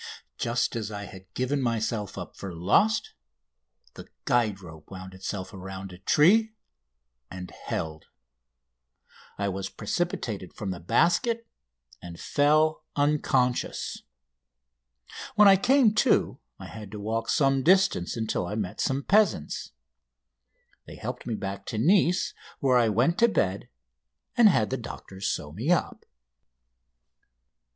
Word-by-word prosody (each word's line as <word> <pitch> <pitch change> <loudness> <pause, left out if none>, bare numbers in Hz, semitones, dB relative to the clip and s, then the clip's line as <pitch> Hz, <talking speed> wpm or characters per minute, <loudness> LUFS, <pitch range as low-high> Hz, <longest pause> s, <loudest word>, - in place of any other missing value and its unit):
Just 120 0 0
as 110 -3 -3
I 100 -1 -6
had 95 -1 -13
given 135 +3 0
myself 110 -4 -2
up - - -7
for 95 -3 -7
lost 155 - +2 0.8
the - - -11 0.2
guide 110 -5 +1
rope 80 -5 -13
wound 95 -1 -9
itself 95 0 -6
around 95 0 -8
a 90 - -12
tree 215 - +4 0.7
and 90 -1 -8
held. 80 -1 -5 1.3
I 100 - -1
was 95 0 -3
precipitated 115 - -3
from 100 -3 -4
the 90 - -5
basket, 230 - +1 0.6
and 85 -1 -9
fell 155 +2 +2
unconscious. 140 -4 0 1.3
When 210 -1 +7
I 195 - +8
came 245 +2 +4
to 215 - +2 0.2
I - - -10
had 105 -2 -9
to 105 - -6
walk 110 +2 -2
some 135 -3 +3
distance 185 - +3
until 110 -5 -2
I 105 - -4
met 100 -2 -3
some 135 +1 0
peasants. 210 +5 +1 1.2
They - - -9
helped - - -6
me 115 - -1
back 100 -1 -5
to 110 - -4
Nice, 180 - +3 0.3
where 130 -2 +4
I 115 -2 +3
went 120 - +2
to 235 - +6
bed, 100 - -1 0.7
and 230 -3 +7
had 110 - +1
the 130 - 0
doctors 100 -4 -7
sew 75 -2 -3
me 110 - -4
up. 175 - 0
115 Hz, 130 wpm, -27 LUFS, 95-155 Hz, 1.3 s, I